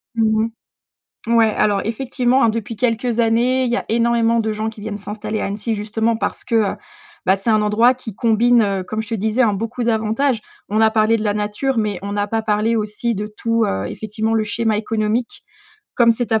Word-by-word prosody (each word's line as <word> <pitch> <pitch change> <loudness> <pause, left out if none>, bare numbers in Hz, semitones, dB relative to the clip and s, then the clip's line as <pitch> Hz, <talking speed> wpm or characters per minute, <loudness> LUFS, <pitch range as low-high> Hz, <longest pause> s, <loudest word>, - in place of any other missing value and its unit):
Mmh 220 -1 +2
mh. - - 0 0.9
Ouais 225 -2 +4
alors 205 -2 +2
effectivement, 250 +2 0
hein, 230 - +5
depuis 225 0 -4
quelques 235 0 0
années 240 +3 +2
il - - -1
y - - +2
a - - -2
énormément 230 0 +2
de 220 -1 -1
gens 215 +1 -2
qui 220 - -12
viennent 205 0 -5
s'installer 210 +1 -5
à - - -1
Annecy 210 +3 -2
justement 225 +2 -1
parce - - -3
que, 235 - -1
heu, 215 -3 +2 0.5
bah, 190 - +4
c'est 195 +4 -3
un 215 -1 +4
endroit 225 +4 +4
qui 230 -5 -9
combine, 235 +1 +3
heu, 195 -3 0
comme 215 +4 -3
je 220 - -10
te - - -3
disais, 220 +4 0
hein, 225 -4 +4
beaucoup 230 +4 -3
d'avantages. 225 +2 +1 0.3
On 215 - +1
a 220 0 +5
parlé 220 +1 +3
de 215 - -4
la 205 -1 +1
nature 210 +5 -2
mais 210 -4 -1
on 200 +1 -5
n'a 205 0 -1
pas 225 +1 -1
parlé 220 +1 +1
aussi 215 +2 -2
de 210 +2 -3
tout, 230 +1 0
heu, 95 +1 -2
effectivement 220 +1 -3
le 220 - +2
schéma 220 0 0
économique. 220 +2 -2 0.5
Comme 235 -1 +5
c'est 230 0 -1
à 220 - +3
220 Hz, 220 wpm, -19 LUFS, 210-230 Hz, 0.9 s, hein